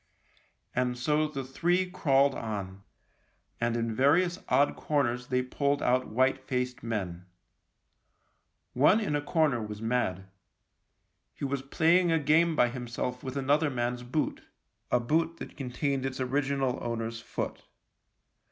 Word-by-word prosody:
And 125 0 0
so 150 +5 +1
the 140 -3 -5
three 175 +8 +1
crawled 140 -5 +3
on, 100 -5 -5 0.8
and 120 0 0
in 115 -1 -1
various 165 +9 +3
odd 145 +1 +3
corners 125 -5 0
they 125 -1 +1
pulled 140 +2 0
out 125 +1 +2
white 130 +4 +2
faced 125 -1 -3
men. 95 -6 -4 1.5
One 150 - +5
in 200 -9 -1
a 145 - 0
corner 145 -5 +1
was 105 -1 -6
mad. 110 -5 -1 1.1
He - - -4
was 140 -1 -2
playing 170 +5 +3
a 165 - +4
game 160 +2 +3
by 120 -4 +4
himself 125 0 -4
with 130 +1 -5
another 145 +3 +2
man's 120 -1 -2
boot 125 +5 -2 0.3
— - - -42
a 125 - +4
boot 160 +7 0
that - - -9
contained 135 0 -2
its 135 0 -3
original 135 0 0
owner's 115 -1 -3
foot. 115 - -5
130 Hz, 140 wpm, -29 LUFS, 120-145 Hz, 1.5 s, One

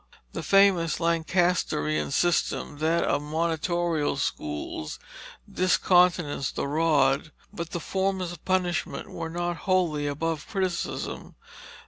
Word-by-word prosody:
The - - -4
famous 195 -4 +4
Lancasterian 165 - +1
system 160 - 0
that 165 +2 +2
of 145 - +1
monitorial 160 0 0
schools 75 - -4 0.5
discountenanced 180 -6 +2
the - - -1
rod, 150 -1 +2 0.2
but 170 -1 -5
the 170 - -4
forms 190 +1 -1
of 175 - -11
punishment 185 -2 -1
were 165 -1 -5
not 175 +1 -2
wholly 170 -6 +2
above 150 +1 -2
criticism. 190 -4 -3
165 Hz, 105 wpm, -26 LUFS, 150-180 Hz, 0.5 s, famous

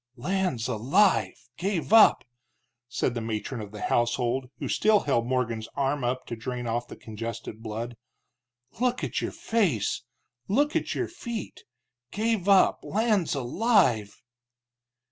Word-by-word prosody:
"Lands 175 -4 -1
alive! 125 - +2 0.2
gave 190 +1 -1
up!" 225 -1 +7 0.7
said 120 - -1
the 120 - -3
matron 110 +2 -4
of 105 -1 -8
the 105 - -7
household, 120 +2 0
who - - -4
still 215 -1 +3
held 120 -5 0
Morgan's 115 -3 -1
arm 140 0 0
up 125 +1 -1
to 115 - -5
drain 120 +2 -5
off 120 +1 -2
the - - -9
congested 115 0 -7
blood. 115 +2 -5 0.8
"Look 250 0 0
at - - -2
your - - -2
face, 180 - 0 0.5
look 290 +9 +1
at - - -1
your - - -1
feet! 235 - -7 0.4
Gave 215 - 0
up 195 -1 +5
lands 210 -7 +1
alive!" 130 - +1
130 Hz, 135 wpm, -27 LUFS, -, 0.8 s, up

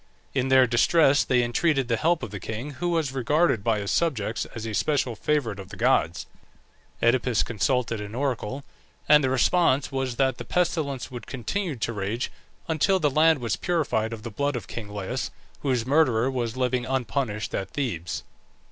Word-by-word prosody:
In 130 -1 0
their 130 -1 +6
distress 140 +4 +4
they 125 -1 +2
entreated 135 +2 +1
the 115 - +1
help 165 +7 +1
of 105 - -5
the 100 - -5
king, 110 +9 -5
who 175 +6 -3
was 165 -5 0
regarded 135 - +1
by 115 -1 +2
his 100 -1 -3
subjects 115 -10 0
as 115 -1 -5
a 110 - -4
special 130 -1 0
favourite 120 -5 -1
of 95 -1 -9
the 100 - -9
gods. 85 0 +2 0.8
Oedipus 120 -1 +3
consulted 115 +1 0
an 105 +2 -7
oracle, 130 -1 -2 0.4
and 150 -1 +6
the 130 - +2
response 135 +1 +2
was 135 -2 -2
that 130 0 +1
the - - -4
pestilence 155 -8 -1
would 120 -3 -8
continue 150 - -3
to 115 0 -2
rage 105 +4 -3 0.4
until 165 +4 +2
the 150 -4 +2
land 160 +2 +5
was 115 -4 -1
purified 145 -10 0
of 110 -2 -7
the 115 - -6
blood 140 +6 -1
of 115 -6 -4
king 110 -3 -7
Laius, 105 +5 -3 0.3
whose 125 -5 0
murderer 130 -4 +3
was 120 -2 -3
living 125 -1 0
unpunished 125 -3 -2
at 95 - -2
Thebes. 90 - -3
125 Hz, 180 wpm, -25 LUFS, 115-145 Hz, 0.8 s, their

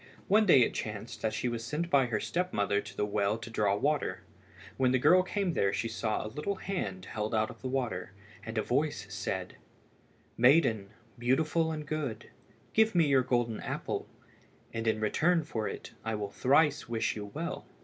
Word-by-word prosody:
One 215 +2 +4
day 135 -8 +7
it - - 0
chanced 105 +1 -5
that 110 - 0
she 110 - -2
was 120 -1 -3
sent 155 +8 -3
by 135 -3 +4
her 110 -3 -1
step 180 +8 -1
mother 100 0 +1
to - - -11
the - - +1
well 105 +1 0
to 115 - -8
draw 105 -3 +2
water. 145 +7 0 0.5
When 130 -1 +2
the - - +5
girl 180 +8 +6
came 185 -1 -1
there 100 -8 +2
she 115 - -1
saw 110 -1 -2
a 110 - -7
little 200 +7 -2
hand 100 - -4
held 110 +3 -3
out 110 0 +1
of - - -15
the 130 - -3
water, 115 -9 -2 0.3
and 115 0 -6
a 110 - +2
voice 145 -3 0
said 95 -3 -4 0.8
"Maiden, 115 -6 +4 0.3
beautiful 155 +6 +2
and 155 -1 -4
good, 145 -6 -4 0.4
give 220 -2 +4
me 170 -2 +5
your 135 -2 +4
golden 120 -3 0
apple, - - -4 0.7
and 115 0 -3
in 110 -1 +2
return 165 +10 +2
for 110 -6 -3
it - - -7
I 110 0 -2
will 100 -1 -4
thrice 145 0 +3
wish 115 -1 0
you 105 -1 -5
well." 165 - -5
120 Hz, 190 wpm, -30 LUFS, 110-155 Hz, 0.8 s, day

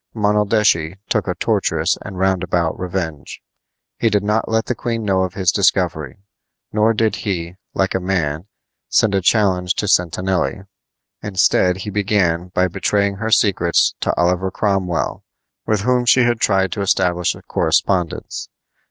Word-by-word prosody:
Monaldeschi 105 -5 +1
took - - 0
a - - -1
tortuous - - 0
and 100 -2 -8
roundabout 90 -3 0
revenge. 90 -5 -5 0.6
He 115 - +2
did 105 -1 +1
not 105 +2 0
let 110 0 +1
the - - -1
queen 115 -1 -3
know 95 -2 +1
of 95 -1 -3
his 90 -2 +2
discovery; 90 -9 0 0.6
nor 110 +1 +3
did 110 -1 +1
he, 90 -4 -4 0.2
like 95 0 0
a - - 0
man, 90 -3 -2 0.4
send 105 -3 +2
a 95 - +1
challenge 90 -3 +2
to 105 - -2
Sentanelli. 95 +2 0 0.6
Instead 95 -2 +2
he 105 - -4
began 95 -4 0
by 90 0 +1
betraying 100 +2 0
her 110 +2 -3
secrets 90 -6 +2
to - - 0
Oliver 90 +2 +1
Cromwell, 95 -4 -1 0.4
with 105 -2 +1
whom 125 +2 +1
she 130 - +5
had 120 -1 +1
tried 95 -4 +1
to 100 - -3
establish 90 -2 +1
a - - -14
correspondence. 90 -4 -1
95 Hz, 150 wpm, -19 LUFS, 90-105 Hz, 0.6 s, she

